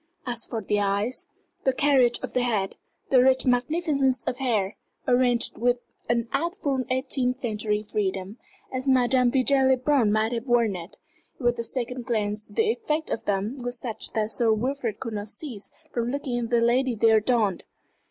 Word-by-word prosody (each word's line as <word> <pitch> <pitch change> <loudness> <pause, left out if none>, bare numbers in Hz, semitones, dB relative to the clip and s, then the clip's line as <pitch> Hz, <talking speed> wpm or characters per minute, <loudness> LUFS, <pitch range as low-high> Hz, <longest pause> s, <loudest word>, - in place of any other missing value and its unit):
As 240 -2 -1
for 225 -3 -4
the 205 +1 0
eyes, 205 +5 -1 0.4
the 265 - +3
carriage 260 -3 +4
of - - -5
the 250 - +2
head, 215 -6 0 0.4
the 255 -2 +6
rich 260 0 +4
magnificence 270 +1 +2
of 250 - -2
hair, 220 -7 0 0.3
arranged 245 -1 +2
with 245 +1 +2 0.3
an 235 -1 +1
artful 290 -4 -1
eighteenth 260 0 -1
century 210 -2 -1
freedom, 195 0 -3 0.4
as 260 +1 -3
Madame 255 -1 +4
Vigée 265 +1 +3
Le 260 - +4
Brun 255 -4 +2
might 215 +1 +1
have 235 +1 -3
worn 235 -4 +3
it 175 +1 -9 0.4
with 240 -2 +1
the 235 - -2
second 250 +1 -3
glance 210 -3 -1
the 445 -1 +1
effect 320 -9 -2
of - - -3
them 205 +6 -1
was 245 0 -2
such 230 -4 -3
that 220 0 0
Sir 230 -1 +2
Wilfrid 235 0 -1
could 230 - -5
not 205 0 -4
cease 230 -4 -4 0.2
from 235 0 -1
looking 260 -2 -2
at - - -7
the 235 -1 +3
lady 245 +1 +2
they 225 +1 +4
adorned. 220 -3 +2
245 Hz, 175 wpm, -25 LUFS, 220-260 Hz, 0.4 s, the